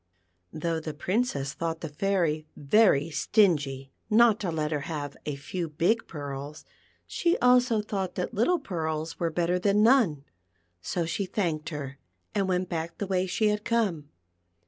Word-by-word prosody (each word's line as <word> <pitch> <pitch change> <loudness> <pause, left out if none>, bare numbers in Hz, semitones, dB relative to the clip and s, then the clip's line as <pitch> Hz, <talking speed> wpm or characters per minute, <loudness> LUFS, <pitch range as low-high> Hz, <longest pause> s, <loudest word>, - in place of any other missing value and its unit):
Though 165 +1 -2
the 155 -1 -6
Princess 155 - -1
thought 165 -1 -3
the 160 - -4
Fairy 155 -1 0
very 160 -1 +3
stingy 140 - +1 0.2
not 225 0 +5
to 190 - -2
let 155 -2 -2
her 150 - 0
have 145 -3 -4
a 150 - -2
few 165 +4 -4
big 170 +9 +1
pearls, 145 0 -7 0.4
she 345 0 +1
also 250 -3 +4
thought 195 -3 -3
that 180 - -3
little 245 - +2
pearls 160 - -4
were 170 - +1
better 175 +2 0
than 205 +2 +3
none, 220 - +4 0.6
so 170 - -2
she 185 +4 -2
thanked 160 -6 -2
her, 140 -3 -6 0.3
and 200 -2 0
went 180 0 0
back 170 -1 -4
the 200 - -2
way 190 -1 0
she 200 +4 +1
had 210 0 -1
come. 195 -12 0
170 Hz, 160 wpm, -27 LUFS, 150-205 Hz, 0.6 s, not